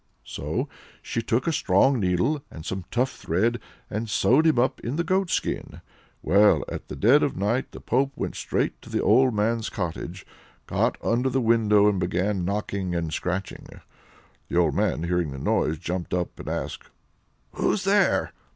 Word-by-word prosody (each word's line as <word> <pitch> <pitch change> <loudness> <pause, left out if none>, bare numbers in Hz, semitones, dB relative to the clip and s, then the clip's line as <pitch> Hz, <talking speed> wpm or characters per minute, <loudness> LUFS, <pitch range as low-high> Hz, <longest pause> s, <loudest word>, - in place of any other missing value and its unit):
So - - -3 0.4
she 115 - -2
took 115 +2 0
a 165 - +1
strong 130 +3 +3
needle, 100 - +1
and 80 - -10
some 95 -2 -4
tough 125 +2 0
thread, 115 +8 0 0.3
and 110 +2 -4
sewed 135 +9 +3
him 155 - +3
up 125 +2 +1
in 120 +4 -4
the 170 - 0
goatskin. 185 -1 -1 0.4
Well, 105 +2 +4
at - - -6
the - - -6
dead 130 +8 +5
of 140 - 0
night, 105 +7 0
the - - -10
pope 135 +2 +1
went - - -3
straight - - -2
to - - -13
the - - -1
old 125 +3 +4
man's 110 +2 0
cottage, 90 0 -5 0.4
got - - 0
under 125 +3 +1
the 130 - 0
window, 110 -3 +4
and 100 -3 +2
began 90 +2 0
knocking 100 -2 -2
and 80 -2 -2
scratching. 90 +1 -3 0.8
The - - -2
old 85 -4 +3
man 80 - 0
hearing 85 -2 0
the 70 - -7
noise, 75 +3 0
jumped 90 +2 -3
up 90 -1 -3
and - - -6
asked: - - -5 0.6
"Who's 205 - 0
there?" 200 +1 +2
105 Hz, 170 wpm, -25 LUFS, 90-130 Hz, 0.8 s, dead